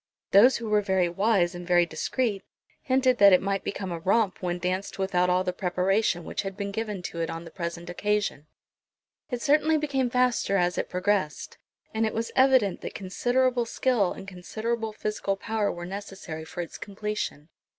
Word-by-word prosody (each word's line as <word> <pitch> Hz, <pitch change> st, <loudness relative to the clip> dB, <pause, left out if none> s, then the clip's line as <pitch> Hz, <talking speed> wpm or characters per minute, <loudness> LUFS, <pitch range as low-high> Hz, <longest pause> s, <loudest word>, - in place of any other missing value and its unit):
Those 235 Hz, +7 st, +7 dB
who 230 Hz, -, -6 dB
were 210 Hz, -1 st, +3 dB
very 190 Hz, -3 st, +2 dB
wise 195 Hz, -1 st, +2 dB
and 175 Hz, 0 st, -8 dB
very 175 Hz, -1 st, +4 dB
discreet 215 Hz, +3 st, -2 dB, 0.4 s
hinted 260 Hz, -3 st, +2 dB
that 200 Hz, -1 st, +8 dB
it 180 Hz, -, +7 dB
might 195 Hz, 0 st, -1 dB
become 190 Hz, -2 st, -4 dB
a 170 Hz, -, -3 dB
romp 195 Hz, +2 st, +1 dB
when 175 Hz, -1 st, -1 dB
danced 185 Hz, +2 st, -3 dB
without 180 Hz, -2 st, +1 dB
all 180 Hz, +1 st, +3 dB
the 180 Hz, -, -2 dB
preparation 180 Hz, 0 st, +1 dB
which -, -, -3 dB
had 195 Hz, -1 st, -6 dB
been 200 Hz, -1 st, -3 dB
given 210 Hz, -3 st, -4 dB
to 170 Hz, -1 st, -4 dB
it 165 Hz, -, -1 dB
on 165 Hz, +1 st, -6 dB
the 165 Hz, -, -10 dB
present 170 Hz, -1 st, -5 dB
occasion. 205 Hz, -4 st, -1 dB, 0.8 s
It 245 Hz, -2 st, -3 dB
certainly 310 Hz, +1 st, +4 dB
became 275 Hz, -4 st, 0 dB
faster 250 Hz, -5 st, +2 dB
as 180 Hz, -1 st, +1 dB
it -, -, -3 dB
progressed, 185 Hz, -4 st, -1 dB, 0.3 s
and 220 Hz, 0 st, 0 dB
it 220 Hz, -, -4 dB
was 230 Hz, +1 st, -2 dB
evident 260 Hz, -7 st, +4 dB
that -, -, -6 dB
considerable 245 Hz, +5 st, 0 dB
skill 230 Hz, -7 st, +1 dB
and 195 Hz, -, -8 dB
considerable 220 Hz, +5 st, -3 dB
physical 210 Hz, -2 st, -2 dB
power 220 Hz, 0 st, -1 dB
were 175 Hz, 0 st, -6 dB
necessary 190 Hz, -4 st, -7 dB
for 160 Hz, +2 st, -5 dB
its 170 Hz, -, -8 dB
completion. 205 Hz, -6 st, -4 dB
195 Hz, 180 wpm, -27 LUFS, 180-225 Hz, 0.8 s, that